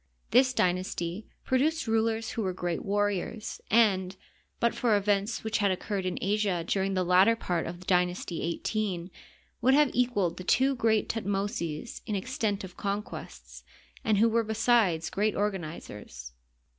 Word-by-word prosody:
This 255 +2 +5
dynasty 180 -1 -1 0.2
produced 305 +5 +1
rulers 225 0 0
who 230 - -3
were 185 -3 -2
g^eat 175 -2 -2
warriors, 205 +1 -2
and, 195 -5 +3 0.4
but 235 - +2
for 225 -4 +2
events 205 +2 0
which 220 0 -1
had 200 -1 +3
occurred 190 0 -2
in 180 - -2
Asia 200 -3 0
during 195 +1 0
the 185 - +1
latter 185 +6 +5
part 175 -7 -2
of 175 +2 -8
Dynasty 180 -2 0 0.2
XVHI, 190 -5 -2 0.5
would 260 +2 +5
have 295 -2 +4
equaled 205 -9 +1
the 185 - -6
two 265 +8 +3
great 225 -3 +2
Thutmoses 195 -5 -3
in 210 - -1
extent 205 -1 -2
of 185 -1 -9
conquests, 205 +1 -6 0.4
and 215 -2 +2
who 225 +3 +5
were 230 0 +2
besides 220 -6 +2
g^eat 205 +3 0
organ 205 -2 0
izers. 105 - -9
205 Hz, 150 wpm, -28 LUFS, 185-225 Hz, 0.5 s, This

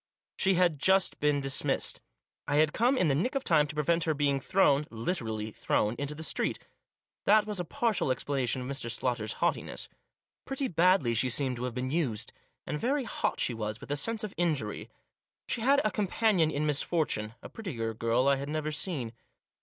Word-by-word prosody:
She 190 -1 +2
had 170 -4 +2
just 190 +5 +3
been 145 -1 +2
dismissed. 135 -1 0 0.5
I 145 - 0
had 155 0 +3
come 250 +4 +2
in 180 - +3
the 140 - +3
nick 230 - 0
of 270 - 0
time 150 - +3
to 145 - -8
prevent 165 +2 +1
her 160 -2 +1
being 140 -1 +1
thrown 150 -3 +2
— - - -31 0.2
literally 110 -11 -2
thrown 105 +1 0
— - - -10
into 145 +1 -3
the 160 - -6
street - - 0 0.7
That 210 +1 +5
was 210 -3 -4
a 175 - -2
partial 235 - 0
explana 130 0 -1
tion 130 - 0
of - - -6
Mr. 135 -3 -1
Slaughter's 115 -2 -1
haughtiness. - - -2 0.5
Pretty 270 0 -2
badly 170 - +3
she 120 +3 +2
seemed 125 0 +1
to 125 - -3
have 125 -2 -4
been 130 +1 -2
used. 140 -10 -1 0.3
And 150 +2 -3
very 275 +4 0
hot 230 - -1
she 125 - +1
was 110 -1 -4
with - - -9
a - - +1
sense 225 +9 -1
of 210 - -5
injury. 150 -12 -1 0.6
She 235 - -1
had 275 +4 +4
a 215 - +2
companion 195 -3 +2
in 150 0 -1
misfortune; 145 -7 0
a - - -8
prettier 120 - -4
girl 115 +3 +1
I 140 0 +4
had 140 +1 -5
never 155 0 -2
seen. 150 - -2
150 Hz, 200 wpm, -29 LUFS, 125-185 Hz, 0.7 s, That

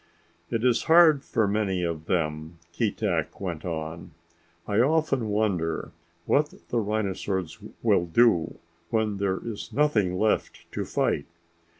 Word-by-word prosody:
"It 115 0 -1
is 125 -2 +2
hard 160 -4 +6
for 110 -6 0
many 100 -3 0
of 80 -2 -3
them," 80 -2 -2 0.2
Keetack 100 -5 -1
went 85 -5 -4
on. 80 -1 -5 0.5
"I 105 +1 +1
often 135 -3 +2
wonder 100 -6 -1 0.3
what 150 +1 +1
the 120 - +1
rhinosaurs 100 -5 -2 0.2
will 85 - +3
do 90 -2 +3 0.3
when 110 -3 0
there 95 -1 0
is 110 -3 -6
nothing 105 -12 +2
left 110 +2 0
to - - -3
fight. 70 - 0
100 Hz, 125 wpm, -26 LUFS, 85-115 Hz, 0.5 s, hard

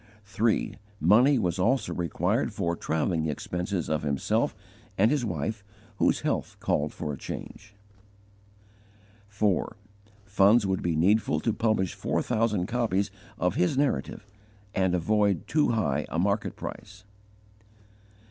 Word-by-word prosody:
3. 105 +3 0 0.2
Money 120 - +5
was 90 -5 -1
also 130 +8 +1
required 85 -2 0
for 85 0 -1
travelling 80 0 -1
expenses 90 +4 -3
of 75 -1 0
himself 70 -2 0 0.4
and 110 +5 +4
his 145 -4 +1
wife, 100 +2 -3 0.3
whose - - +2
health - - -2
called 75 +1 0
for 75 - -4
a - - -6
change. 105 +1 -8 1.5
4. 105 +1 0 0.5
Funds 105 +2 +4
would 95 -1 0
be 85 -2 0
needful 100 +8 +2
to 115 - 0
publish 110 -5 0
four - - -1
thousand 105 -5 0
copies 100 -3 0 0.3
of 90 -1 +1
his 90 +9 +1
Narrative 140 -6 -1 0.5
and 95 -3 +1
avoid 100 +1 +1
too 150 -1 +2
high 75 -9 0
a - - -3
market 100 +4 0
price. - - -8
100 Hz, 130 wpm, -27 LUFS, 85-110 Hz, 1.5 s, Money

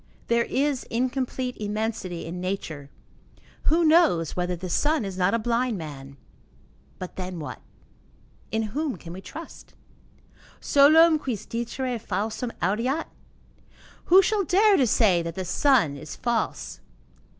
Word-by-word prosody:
There 235 0 +3
is 280 -1 0
incomplete 255 +1 -2
immensity 210 -4 -3
in 175 +2 -6
nature. 165 -7 -4 0.8
Who 330 +2 +3
knows 310 - +4
whether 180 0 -1
the 180 +2 -6
sun 295 - +1
is 195 -1 -5
not 185 +4 +2
a - - +3
blind 235 0 0
man? 140 -4 -9 0.8
But 185 - -8
then, 185 -1 -5
what? 150 - -7 0.9
In 220 0 0
whom 300 -3 -1
can 170 -1 -10
we 185 - -8
trust? 325 - -11 0.8
Solem 310 +3 +6
quis 245 -8 -4
dicere 240 +1 -3
falsum 215 +4 -3
audeat? 235 - 0 1.0
Who 375 +3 +7
shall 410 +1 +1
dare 400 +5 +4
to 265 -8 +3
say 200 -6 +3
that 165 0 -5
the 185 - -4
sun 205 - +3
is 155 +1 -8
false? 235 -2 -2
230 Hz, 135 wpm, -25 LUFS, 180-275 Hz, 1.0 s, Who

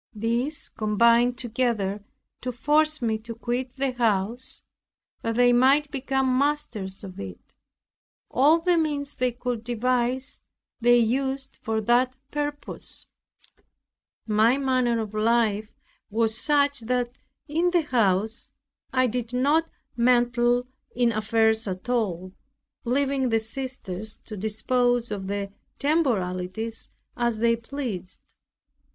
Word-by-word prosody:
These 235 +7 -1
combined 235 +3 +3
together 225 -5 -1 0.4
to 250 - -2
force 300 +4 +2
me 220 -1 0
to 230 +1 -8
quit 245 +2 -3
the 270 -1 0
house, 230 0 -1 0.6
that 230 0 -2
they 245 0 +5
might 275 +4 +4
become 265 -2 +1
masters 240 -10 -1
of 185 -2 -9
it. 95 -2 -9 0.8
All 290 +6 +5
the 345 0 +2
means 290 -2 -1
they 250 0 +1
could 245 -1 -4
devise 245 +2 -1 0.4
they 240 0 +5
used 265 +3 -1
for 220 0 -1
that 245 +3 +2 0.2
purpose. 290 0 -3 1.2
My 220 +4 +3
manner 255 -4 +1
of 215 -1 -6
life 215 -1 +2 0.4
was 225 +1 +1
such, 285 +2 +2
that 245 +1 -2 0.3
in 330 +4 +1
the 350 -2 +2
house 220 -5 0 0.4
I 255 -1 +3
did 245 0 -3
not 290 +6 +2 0.3
meddle 240 0 +3 0.3
in 240 -1 +3
affairs 220 0 +2
at 185 +5 -5
all, 185 -7 -1 0.5
leaving 270 +1 +1
the 225 -1 +3
sisters 220 -4 -4
to 215 - -7
dispose 240 +3 0
of 195 -2 -4
the 200 0 -3 0.3
temporalities 220 - -1 0.3
as 240 -2 0
they 230 +1 +3
pleased. 230 -6 -5
240 Hz, 120 wpm, -25 LUFS, 220-260 Hz, 1.2 s, they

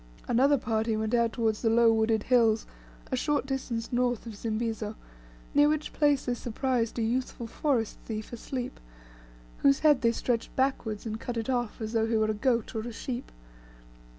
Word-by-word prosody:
Another 270 +4 +4
party 225 -2 0
went 220 +1 -2
out 235 -1 +3
towards 225 -3 0
the 225 - +2
low 230 0 +5
wooded 220 -1 +2
hills, 230 -3 +3 0.5
a - - +2
short 290 +2 0
distance 255 -4 -3
north 245 -1 +1
of 225 -2 -7
Zimbizo, 220 0 -3 0.6
near 290 +1 +5
which 305 0 -1
place 290 -3 +2
they 245 - 0
surprised 240 0 -1
a 230 - +1
youthful 240 +1 -2
forest 235 -2 -1
thief 220 0 -5
asleep, 245 +2 -5 0.8
whose 275 -1 +4
head 295 -4 +5
they 230 -2 +4
stretched 235 0 -2
backwards, 245 -6 -1
and 220 0 -4
cut 240 0 -4
it 230 +3 -1
off 240 -3 -1
as 220 0 -4
though 225 -1 +2
he 225 0 +1
were 215 0 +2
a - - -1
goat 235 +1 0
or 225 - -2
a 240 +2 -6
sheep. 240 +2 -5
235 Hz, 180 wpm, -29 LUFS, 220-255 Hz, 0.8 s, low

